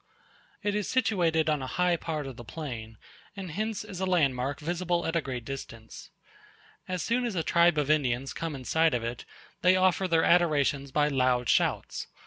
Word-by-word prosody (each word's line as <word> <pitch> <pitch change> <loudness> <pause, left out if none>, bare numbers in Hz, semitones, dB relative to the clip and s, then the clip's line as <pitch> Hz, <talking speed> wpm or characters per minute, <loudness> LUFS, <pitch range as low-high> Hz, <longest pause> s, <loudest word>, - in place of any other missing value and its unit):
It 205 0 0
is 210 -1 -2
situated 175 -11 +2
on 150 -3 +1
a 130 - -4
high 180 -1 +3
part 155 -3 -4
of 135 -2 -7
the 120 - -10
plain; 115 -6 -7 0.4
and 190 -4 -6
hence 215 +4 -3
is 185 - -8
a 190 - -1
landmark 140 -6 +1
visible 175 +2 -1
at 165 - -2
a 165 - +2
great 125 -5 -5
distance. 115 -5 -8 0.8
As 185 -1 -2
soon 240 +2 0
as 235 -5 -2
a 165 - 0
tribe 170 0 +4
of 150 0 +2
Indians 135 -3 0
come 165 -3 -4
in 130 -2 -9
sight 160 -2 +3
of 120 - -2
it, 120 +1 -5 0.4
they 180 +1 +5
offer 185 0 +2
their 165 -2 +3
adorations 145 -5 +2
by 150 +2 +2
loud 130 -3 +1
shouts. - - 0
160 Hz, 190 wpm, -28 LUFS, 135-180 Hz, 0.8 s, they